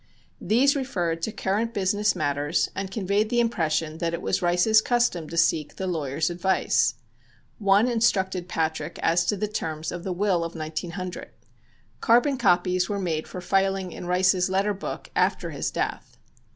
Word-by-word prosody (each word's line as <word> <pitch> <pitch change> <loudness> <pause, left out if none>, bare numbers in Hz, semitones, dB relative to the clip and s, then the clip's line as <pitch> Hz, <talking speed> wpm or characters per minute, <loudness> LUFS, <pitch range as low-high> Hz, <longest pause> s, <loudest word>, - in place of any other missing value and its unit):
These 255 +9 +3
referred 175 -12 -2
to 220 - -2
current 215 +4 -2
business 205 +1 +1
matters 145 -1 0
and 195 0 -3
conveyed 200 +1 0
the 240 - +1
impression 160 -8 0
that 170 0 -1
it - - -7
was - - 0
Rice's 180 +5 +4
custom 235 -10 0
to 170 - -6
seek 160 -2 +1
the 190 - -4
lawyer's 155 -2 -1
advice. 180 +2 +1 0.6
One 200 +2 +4
instructed 190 -6 +1
Patrick 160 -2 -2
as 170 +1 +3
to 210 - 0
the 210 +2 -1
terms 160 -6 -4
of 175 -1 -6
the 190 - -3
will 180 -2 +1
of 165 0 -6
1900. 165 +3 -5 0.7
Carbon 245 +3 +3
copies 180 -3 +2
were 205 - -1
made 165 -5 -2
for 180 - -7
filing 195 0 0
in 175 - -8
Rice's 185 +1 +2
letter 195 +2 +1
book 200 - -7
after - - +1
his - - -2
death. - - -4
185 Hz, 165 wpm, -25 LUFS, 170-205 Hz, 0.7 s, Rice's